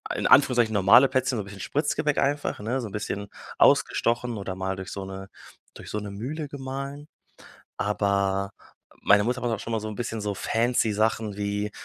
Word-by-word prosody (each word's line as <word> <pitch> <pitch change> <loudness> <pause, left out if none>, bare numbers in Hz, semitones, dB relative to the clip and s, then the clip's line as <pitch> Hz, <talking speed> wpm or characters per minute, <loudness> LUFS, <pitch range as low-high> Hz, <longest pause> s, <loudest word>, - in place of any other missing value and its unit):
in - - 0
Anführungszeichen 120 -5 +5
normale 100 +6 +6
Plätzchen, 130 -1 0
so 105 - -2
'n - - -13
bisschen 100 -1 -10
Spritzgebäck 150 - 0
einfach, 145 +1 0
ne, 120 +6 -2
so 115 - -5
'n - - -10
bisschen 100 -1 -4 0.3
ausgestochen 120 0 +2
oder 100 -2 -4
mal 95 0 -2
durch 95 -1 -7
so 100 -1 -5
'ne 95 0 -8 0.5
durch - - -10
so 105 - -2
'ne 105 -1 -7
Mühle 140 +10 -5
gemahlen, 140 +1 -6 0.7
aber 100 -1 0 0.5
meine 105 0 +5
Mutter 125 +2 -1
macht 120 - 0
auch 110 - -2
schon 115 - -5
mal 110 - 0
so 110 - -5
'n 105 - -6
bisschen 115 -2 -3
so 105 -1 -2
fancy 115 +2 +1
Sachen 110 -1 0
wie 105 0 -2
110 Hz, 190 wpm, -26 LUFS, 100-125 Hz, 0.7 s, normale